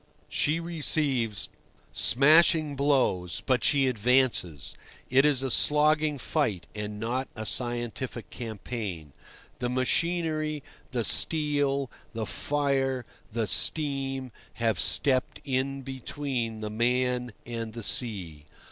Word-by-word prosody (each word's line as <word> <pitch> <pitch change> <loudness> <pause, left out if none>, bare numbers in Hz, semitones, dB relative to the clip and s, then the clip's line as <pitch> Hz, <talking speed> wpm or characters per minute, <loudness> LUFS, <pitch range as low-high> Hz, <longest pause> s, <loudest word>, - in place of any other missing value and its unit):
She 155 +3 +1
receives 145 -9 0 0.5
smashing 155 +2 +4
blows, 130 - +1
but 130 -1 +1
she 140 -2 +4
advances; 125 - +1 0.4
it 135 +2 +5
is 140 -3 +2
a 135 - -1
slogging 150 +1 +4
fight, 120 - -1
and 105 0 -5
not 125 +4 -2
a 110 -2 -5
scientific 120 0 -2
campaign. 105 - -6 0.5
The 125 0 -1
machinery, 155 +3 0 0.3
the 120 -3 -1
steel, 145 -2 +3 0.2
the 110 -1 -3
fire, 135 -3 -1 0.3
the 115 0 -1
steam, 135 +3 0 0.2
have 115 -5 0
stepped 130 -2 +2
in 135 0 -2
between 130 -3 -4
the 105 -1 -4
man 125 +2 0
and 115 -2 -5
the 115 -1 -7
sea. 90 - -1
130 Hz, 110 wpm, -27 LUFS, 115-145 Hz, 0.5 s, it